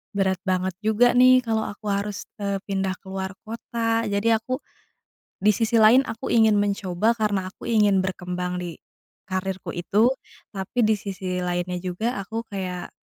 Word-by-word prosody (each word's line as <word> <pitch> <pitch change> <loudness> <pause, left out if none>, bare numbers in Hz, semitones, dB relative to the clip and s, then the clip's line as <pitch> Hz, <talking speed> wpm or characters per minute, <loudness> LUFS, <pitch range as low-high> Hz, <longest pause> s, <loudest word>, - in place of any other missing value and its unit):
berat 190 -2 +1
banget 185 0 +1
juga 220 +3 +4
nih, 255 0 +7
kalau 220 -2 0
aku 210 +1 -10
harus, 200 0 -2 0.2
eee, 200 -1 -1
pindah 195 -1 -1
ke - - -19
luar 190 0 -4
kota. 230 0 -1
Jadi 200 +2 +1
aku 255 +4 -3 0.8
di 210 - +3
sisi 225 +3 -1
lain 225 +3 +7
aku 225 - -5
ingin 220 -2 +5
mencoba, 205 0 +1
karena 200 -3 0
aku - - -11
ingin 210 -4 +4
berkembang 180 -1 -3
di 175 -2 -6 0.5
karirku 190 0 -3
itu. 205 +7 +3 0.5
Tapi 190 +5 -5
di 220 -2 +4
sisi 185 -2 -4
lainnya 175 0 -2
juga, 185 +7 -2
aku 220 +3 -4
kayak 185 -3 -4
200 Hz, 155 wpm, -24 LUFS, 185-220 Hz, 0.8 s, nih